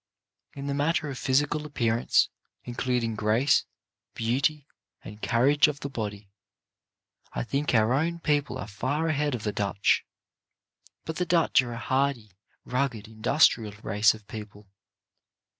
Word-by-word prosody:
In 140 0 -6
the 140 - -1
matter 150 +1 0
of 130 - -6
physical 145 +3 +1
appearance, 120 -6 +1 0.3
including 120 -1 -1
grace, 110 +7 +2 0.5
beauty, 135 +6 0 0.4
and 105 +1 -10
carriage 140 +6 +4
of 150 -1 -4
the 140 - -5
body, 105 -4 -5 1.0
I - - -2
think 140 - -1
our 110 +2 +4
own 165 +5 0
people 150 -3 0
are - - -5
far 130 - -1
ahead 150 -3 0
of 110 - -7
the 105 - -2
Dutch. 100 0 +1 1.0
But 160 0 -5
the 180 - 0
Dutch 165 -5 +4
are 120 -2 -6
a - - -6
hardy, 130 -3 -1 0.3
rugged, 125 -4 -2
industrious 110 -2 +2
race 105 +2 +3
of 105 -2 -16
people. 105 -2 -10
125 Hz, 140 wpm, -27 LUFS, 110-145 Hz, 1.0 s, carriage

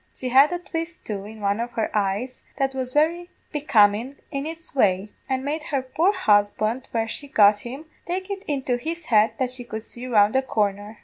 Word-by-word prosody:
She 255 - -4
had 270 +5 +6
a 355 - -1
twist, 335 -2 -6
too, 200 -2 -4
in 215 +1 -10
one 200 +1 0
of 240 +1 -3
her 220 - -1
eyes 210 +5 -1 0.2
that 270 -1 0
was 260 -1 -3
very 335 +5 +1 0.2
becomin' 245 -3 +3 0.2
in 275 0 -3
its 325 0 -8
way, 205 -5 +2 0.2
and 265 0 -1
made 300 +2 -2
her 275 -3 -1
poor 320 +9 +2
husband, 215 - +1
when 225 -1 -1
she 285 +5 -5
got 205 -5 +5
him, 265 +8 -8 0.2
take 370 +3 -3
it 390 -1 -4
into 265 -4 0
his 330 +6 -5
head 215 -1 +4
that 255 -1 -1
she 250 -1 -7
could 220 -2 -6
see 240 +2 -8
round 215 -2 +4
a 265 - +4
corner. 210 -3 -2
255 Hz, 205 wpm, -24 LUFS, 215-295 Hz, 0.2 s, had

